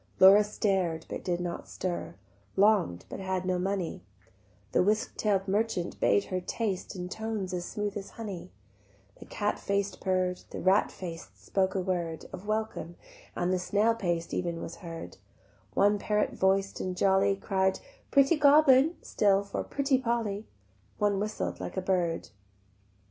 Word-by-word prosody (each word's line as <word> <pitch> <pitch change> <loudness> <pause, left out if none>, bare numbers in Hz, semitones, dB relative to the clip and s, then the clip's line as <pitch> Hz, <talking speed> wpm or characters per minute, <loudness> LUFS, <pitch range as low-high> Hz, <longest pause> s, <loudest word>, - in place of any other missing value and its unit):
Laura 195 +3 +9
stared 190 -6 0
but - - -5
did 175 -1 -1
not 175 -1 -4
stir, 180 -2 -4 0.4
Long'd 195 - +3
but - - -7
had 190 -1 -2
no 180 -1 0
money: 190 -2 -2 0.7
The - - +3
whisk 210 +3 +1
tail'd 200 -2 +1
merchant 200 -3 -1
bade 200 - +3
her 185 - 0
taste 195 0 -3
In 180 -1 -4
tones 215 -2 -4
as 175 -1 -2
smooth 210 -1 -3
as 195 -2 -5
honey, 200 - -6 0.7
The - - -10
cat 205 0 -1
faced 200 0 -1
purr'd, 185 -1 0
The - - -6
rat 190 +2 +3
faced 170 -3 -9
spoke 190 -1 +1
a - - +1
word 170 -4 -2
Of 185 +2 -8
welcome, 215 -6 -2 0.4
and 180 +1 0
the 185 - +1
snail 205 +5 +2
paced 175 -6 -2
even 170 -2 -2
was 165 - -7
heard; 165 -1 -8 0.6
One 205 +1 +4
parrot 210 +1 0
voiced 195 +1 +1
and 185 -1 -3
jolly 195 +1 +3
Cried 190 -1 0 0.3
"Pretty 280 +3 +4
Goblin" 290 +1 +6
still 200 -1 +2
for 200 - -4
"Pretty 275 -2 +1
Polly;" 230 -4 -1 0.5
One 205 -1 +2
whistled 210 +1 -3
like - - -6
a - - +3
bird. 180 -3 0
195 Hz, 155 wpm, -29 LUFS, 180-210 Hz, 0.7 s, Laura